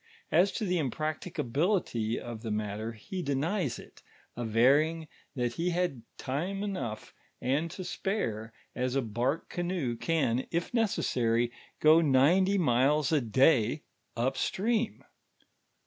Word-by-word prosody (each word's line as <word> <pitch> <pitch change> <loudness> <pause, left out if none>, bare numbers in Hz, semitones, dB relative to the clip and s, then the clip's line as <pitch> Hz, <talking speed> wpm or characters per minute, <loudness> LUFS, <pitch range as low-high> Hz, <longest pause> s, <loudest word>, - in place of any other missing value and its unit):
As 180 +5 +4
to 215 - -2
the 180 -2 +1
impracticability 155 - -1
of 120 -2 -7
the 115 - -5
mat 105 -1 -2
ter, 115 +1 -4
he 180 - -6
denies 145 - -1
it, - - -14 0.3
averring 140 +8 +2 0.3
that 120 -2 -1
he 170 +7 -1
had 175 -8 -1 0.2
time 175 +9 -3
enough 130 - -4 0.3
and 145 +6 0
to 185 - -7
spare, 145 - -3 0.2
as 125 +1 -1
a 135 - +1
bnrk 120 +7 -1
canoe 175 -9 -2
can, 130 -4 0
if 170 0 -2
necessory, 120 - +1 0.3
go 155 +2 +6
ninety 165 +8 +4
miles 145 -1 +3
a 155 -3 +3
day 130 +3 +3 0.3
up 130 +3 0
streani 220 - -1
145 Hz, 130 wpm, -30 LUFS, 120-175 Hz, 0.3 s, go